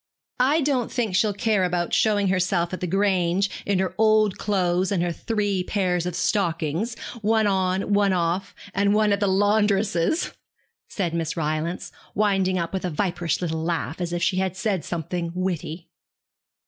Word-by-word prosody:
I 285 +6 +3
don't 265 -4 0
think 225 -7 -1
she'll 210 +2 +3
care 210 -1 +1
about 175 -1 -1
showing 205 -3 +3
herself 185 -2 +1
at 185 - -3
the 180 - -1
Grange 190 0 +1 0.2
in 200 -1 +2
her 190 0 -1
old 215 -2 +3
clothes 185 -2 +1
and 180 -4 +1
her 175 - 0
three 205 0 -1
pairs 180 -3 0
of 180 - -3
stockings, 175 +4 -1 0.2
one 220 +1 +2
on, 190 0 +1
one 200 -1 +3
off, 180 +3 -1 0.2
and 200 +1 +2
one 210 -1 +3
at 200 - 0
the 200 - +1
laundress's,' 205 - +2 0.6
said 180 -6 -2
Miss 165 0 -2
Rylance, 155 +2 -2 0.2
winding 195 -3 +2
up 170 0 -3
with 190 - -2
a 180 - -1
viperish 175 -1 -1
little 160 -2 -2
laugh 165 0 -2
as 175 -1 -2
if 175 0 -2
she 185 - +1
had 190 -1 -1
said 190 -4 -1
something 170 +1 -3
witty. 175 -2 -3
190 Hz, 170 wpm, -24 LUFS, 175-205 Hz, 0.6 s, I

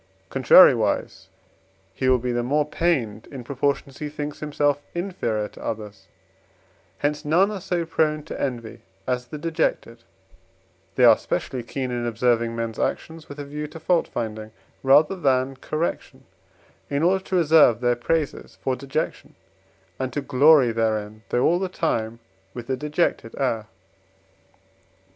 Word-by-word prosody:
Contrariwise, - - +4 0.7
he 130 +6 0
will 130 - +5
be 125 +1 -3
the 120 0 0
more 145 +5 +1
pained 130 -11 -1
in 130 -3 -8
proportion 140 +3 -1
as 135 - -15
he 150 - -4
thinks 150 0 -6
himself 145 -1 0
inferior 145 - -2
to - - -14
others; 105 -3 -6 0.9
hence 150 +1 -1
none 175 +7 +3
are 200 -3 -5
so 175 -2 -2
prone 155 -2 0
to 160 - -7
envy 115 -4 -4 0.2
as 125 -1 -2
the 150 - -7
dejected, 160 -7 -2 0.9
they - - +2
are - - +7
specially 130 - -3
keen 130 +2 -4
in 120 -1 -2
observing 115 0 +1
men's 115 -1 -4
actions, 160 -1 -3
with 145 - -9
a 145 - -6
view 150 +1 -5
to 160 +2 -11
fault 175 +1 +1
finding 110 -1 -5 0.3
rather 145 +7 +5
than 135 -5 +1
correction, 155 +5 -4 0.7
in 140 +2 0
order 190 +2 +2
to 190 - -3
reserve 155 -9 +5
their 120 0 +2
praises 150 +5 -2
for 130 - 0
dejection, 140 +4 -4 0.6
and 130 -1 -2
to 145 - -2
glory 140 -1 +5
therein, 110 -1 -2
though 120 - +1
all 175 +2 +3
the 190 -1 -2
time 115 -10 -2 0.4
with 120 -1 -7
a - - +1
dejected 150 -4 -1
air. 115 -5 -1
135 Hz, 150 wpm, -23 LUFS, 120-155 Hz, 0.9 s, are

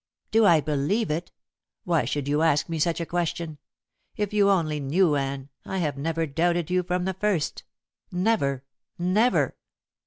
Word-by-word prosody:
"Do 220 -1 +5
I 165 -4 +6
believe 155 +8 0
it? 165 +3 -3 0.5
Why 165 -7 +1
should 140 +2 -2
you 145 +2 +1
ask 160 -2 +3
me 165 -2 -3
such 170 +2 +1
a 170 - -2
question? 170 -2 -3 0.6
If 210 -1 -2
you 205 -1 +4
only 160 -6 +1
knew, 150 +3 +2
Anne, 135 0 -3
I 190 - -4
have 150 -6 -1
never 165 +3 -1
doubted 170 +3 0
you 180 0 +3
from 180 0 -2
the 190 - -1
first. 190 -4 -1 0.5
Never! 175 - +1 0.3
never!" 200 +8 +2
165 Hz, 160 wpm, -26 LUFS, 150-185 Hz, 0.6 s, I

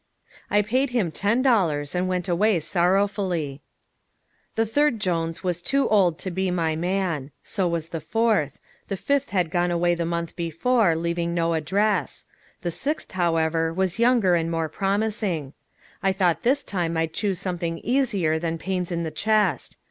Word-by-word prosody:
I 210 0 +3
paid 255 +6 +1
him 230 -9 0
ten 220 +9 +1
dollars 165 - +2
and 180 +1 0
went 180 -1 -1
sorrowfully 185 -1 +1
away. 140 0 -9 0.9
The 225 - +2
third 285 +1 +2
Jones 165 -4 -1
was 175 -2 -1
too 275 +9 +1
old 185 -6 +3
to 185 +1 -4
be 190 +1 -1
my 165 -3 0
man; 175 -4 -1
so 190 -4 -1
was 170 -1 -2
the 165 - -5
fourth; 220 - +1 0.3
the 195 - -3
fifth 280 +7 0
had 180 -4 0
gone 175 -1 +1
away 175 0 +2
the 170 0 -1
month 170 0 -3
before, 175 +3 +1
leaving 170 +1 -1
no 165 -1 +1
address; 200 +7 0 0.4
the 175 - -1
sixth, 295 - -2
however, 165 -2 +1
was 185 +3 -1
younger 235 -6 +4
and 165 -1 +1
more 165 -1 -1
promising. 195 - -1 0.5
I 195 -1 +2
thought 180 -3 +1
this 275 +4 +2
time 170 -4 -2
I'd 160 0 -1
choose 200 -1 -1
something 170 -3 -3
easier 205 - +1
than 165 0 -2
pains 180 0 -3
in 170 -1 -1
the 160 - -3
chest. 215 -2 0
180 Hz, 165 wpm, -24 LUFS, 165-205 Hz, 0.9 s, younger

